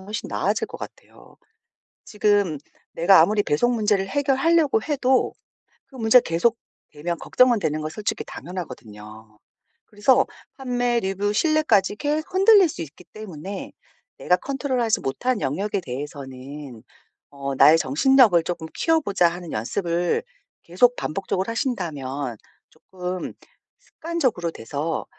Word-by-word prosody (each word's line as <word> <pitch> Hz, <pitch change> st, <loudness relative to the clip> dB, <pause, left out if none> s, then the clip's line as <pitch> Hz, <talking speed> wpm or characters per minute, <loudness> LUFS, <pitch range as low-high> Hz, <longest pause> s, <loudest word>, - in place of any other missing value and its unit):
훨씬 210 Hz, +4 st, -6 dB
나아질 -, -, -1 dB
것 -, -, -10 dB
같아요. -, -, -12 dB, 0.7 s
지금 205 Hz, -6 st, +1 dB, 0.4 s
내가 170 Hz, +1 st, +6 dB
아무리 205 Hz, +5 st, +2 dB
배송 240 Hz, +12 st, +1 dB
문제를 205 Hz, -3 st, +1 dB
해결하려고 285 Hz, +1 st, +2 dB
해도 265 Hz, -3 st, +1 dB, 0.5 s
그 270 Hz, -, -18 dB
문제가 235 Hz, 0 st, +5 dB
계속되면 170 Hz, -3 st, -3 dB
걱정은 250 Hz, -3 st, +3 dB
되는 155 Hz, -5 st, -2 dB
건 155 Hz, -, -3 dB
솔직히 210 Hz, +5 st, -3 dB
당연하거든요. 110 Hz, -, -10 dB, 0.5 s
그래서 210 Hz, +5 st, +3 dB, 0.3 s
판매, 245 Hz, -2 st, 0 dB
리뷰, 195 Hz, +1 st, -1 dB
신뢰까지 245 Hz, -, +2 dB
계속 300 Hz, -, -2 dB
흔들릴 390 Hz, 0 st, +6 dB
수 280 Hz, -, -7 dB
있기 160 Hz, +3 st, -10 dB
때문에 195 Hz, -2 st, -7 dB, 0.5 s
내가 180 Hz, -, +2 dB
컨트롤하지 255 Hz, -, -1 dB
못한 230 Hz, -, -1 dB
영역에 195 Hz, +9 st, -1 dB
대해서는 135 Hz, -2 st, -8 dB, 0.5 s
어 140 Hz, -1 st, -5 dB
'나의 155 Hz, +4 st, +7 dB
정신력을 195 Hz, -, +4 dB
조금 170 Hz, -1 st, -4 dB
키워 325 Hz, 0 st, +2 dB
보자.' 195 Hz, -, +2 dB
하는 175 Hz, -1 st, -8 dB
연습을 170 Hz, -, -1 dB, 0.4 s
계속 240 Hz, +9 st, +3 dB
반복적으로 190 Hz, +4 st, -3 dB
하신다면 145 Hz, -, -3 dB, 0.3 s
쪼끔 180 Hz, -1 st, -6 dB, 0.5 s
습관적으로 260 Hz, -, -2 dB
돼서 145 Hz, +6 st, -4 dB
195 Hz, 305 characters per minute, -23 LUFS, 155-245 Hz, 0.7 s, 나의